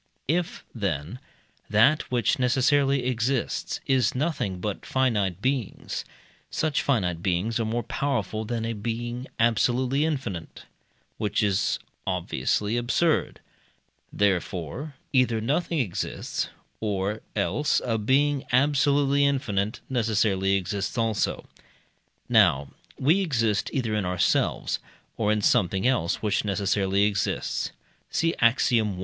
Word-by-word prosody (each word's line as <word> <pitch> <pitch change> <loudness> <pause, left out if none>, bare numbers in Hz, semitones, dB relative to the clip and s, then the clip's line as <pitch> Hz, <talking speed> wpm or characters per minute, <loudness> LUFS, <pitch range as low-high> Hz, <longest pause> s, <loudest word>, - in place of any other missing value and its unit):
If, 170 +4 -1
then, 95 - -3 0.5
that 115 +9 +4
which 120 0 +1
necessarily 135 +1 +3
exists 125 +1 -1
is 130 -1 +2
nothing 125 - -1
but 105 +1 -4
finite 105 -8 0
beings, 130 -5 -2 0.4
such 155 -2 0
finite 90 -11 0
beings 95 +5 0
are 115 - 0
more 115 +2 -1
powerful 110 -6 -2
than 115 0 -3
a 115 - -2
being 120 +4 -4
absolutely 125 +5 +2
infinite, 125 - -4 0.5
which 105 0 0
is 100 -2 +1 0.3
obviously 90 - 0
absurd; 125 +7 +1 0.7
therefore, 100 - -1 0.2
either 125 -4 +3
nothing 155 +9 0
exists, 110 - -2 0.3
or 105 0 -2
else 105 - +1
a 115 -2 0
being 140 +5 +2
absolutely 140 +1 +3
infinite 110 -7 0
necessarily 105 -5 +1
exists 100 +3 -2
also. 115 -2 0 0.8
Now 70 +1 +4 0.3
we 160 +9 +3
exist 115 - +1
either 120 -5 -1
in 105 -3 0
ourselves, 90 0 +1 0.4
or 105 -2 +1
in 105 -1 0
something 95 +2 +2
else 115 -10 +1
which 105 -1 +1
necessarily 100 0 +1
exists 100 -1 -1 0.4
(see 165 0 +1
Axiom. 115 -4 +3
115 Hz, 110 wpm, -26 LUFS, 100-130 Hz, 0.8 s, that